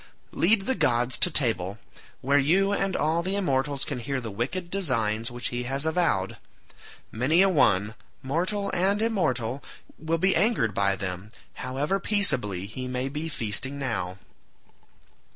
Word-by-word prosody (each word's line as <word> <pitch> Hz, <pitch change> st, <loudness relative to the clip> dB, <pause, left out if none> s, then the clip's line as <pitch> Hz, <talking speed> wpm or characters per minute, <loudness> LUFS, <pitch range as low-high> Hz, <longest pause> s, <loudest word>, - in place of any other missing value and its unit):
Lead 205 Hz, +4 st, +3 dB
the 260 Hz, -, 0 dB
gods 125 Hz, -, +1 dB
to 180 Hz, -, +5 dB
table, 110 Hz, -, +2 dB, 0.4 s
where 140 Hz, +2 st, +3 dB
you 185 Hz, +8 st, +2 dB
and 195 Hz, -2 st, -1 dB
all 160 Hz, +2 st, +1 dB
the 190 Hz, +3 st, -2 dB
immortals 140 Hz, -7 st, 0 dB
can 140 Hz, -4 st, -4 dB
hear 135 Hz, +3 st, -3 dB
the 115 Hz, -3 st, -6 dB
wicked 170 Hz, -, -4 dB
designs 115 Hz, -, 0 dB
which 120 Hz, 0 st, -3 dB
he 120 Hz, 0 st, -3 dB
has 135 Hz, +4 st, -1 dB
avowed. 160 Hz, -, 0 dB, 0.7 s
Many 145 Hz, +11 st, +3 dB
a 195 Hz, -, +4 dB
one, 105 Hz, -, +2 dB, 0.3 s
mortal 185 Hz, +9 st, -1 dB
and 195 Hz, +3 st, +2 dB
immortal, 140 Hz, -, -1 dB, 0.4 s
will 160 Hz, +1 st, -1 dB
be 190 Hz, +3 st, +2 dB
angered 190 Hz, -, +2 dB
by 100 Hz, 0 st, +2 dB
them, 95 Hz, +2 st, -6 dB, 0.3 s
however 140 Hz, +9 st, -1 dB
peaceably 130 Hz, -, +2 dB
he 125 Hz, +5 st, -6 dB
may 125 Hz, +1 st, -3 dB
be 150 Hz, +3 st, -4 dB
feasting 130 Hz, +2 st, -2 dB
now." 115 Hz, -9 st, -3 dB
135 Hz, 150 wpm, -26 LUFS, 115-180 Hz, 0.7 s, to